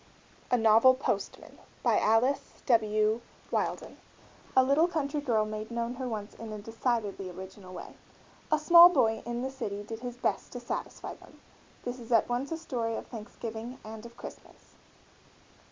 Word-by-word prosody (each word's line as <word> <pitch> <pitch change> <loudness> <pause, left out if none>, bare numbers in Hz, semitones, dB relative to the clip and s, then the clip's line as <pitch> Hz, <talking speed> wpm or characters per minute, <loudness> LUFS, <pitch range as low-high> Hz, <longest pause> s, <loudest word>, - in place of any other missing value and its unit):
A 250 - +4
NOVEL 225 +3 +6
POSTMAN 265 - -3 0.2
BY - - +4
ALICE 255 +6 +1
W. 215 -1 +3 0.3
WHEILDON. - - -2 0.6
A 260 - +8
little 280 +6 +4
country 300 -3 -2
girl 225 -6 +2
made 215 0 -5
known 235 0 -2
her 255 0 -4
wants 210 -2 -5
in 225 -1 -8
a 215 - -5
decidedly 220 -3 -2
original 185 +1 -10
way. 185 - -8 0.6
A 310 - +5
small 340 +3 +9
boy 230 -9 +2
in 240 +1 -2
the 265 - -2
city 205 -6 -4
did 225 +1 -7
his 245 0 -6
best - - -1
to 245 - -5
satisfy 240 - -5
them. - - -17 0.4
This 245 +1 -4
is 235 0 -10
at 225 -2 +4
once 245 +4 -2
a 325 - -1
story 240 -8 -2
of - - -5
Thanksgiving 230 +1 -7
and 220 0 -8
of 235 0 -12
Christmas. - - -12
235 Hz, 165 wpm, -30 LUFS, 215-260 Hz, 0.6 s, small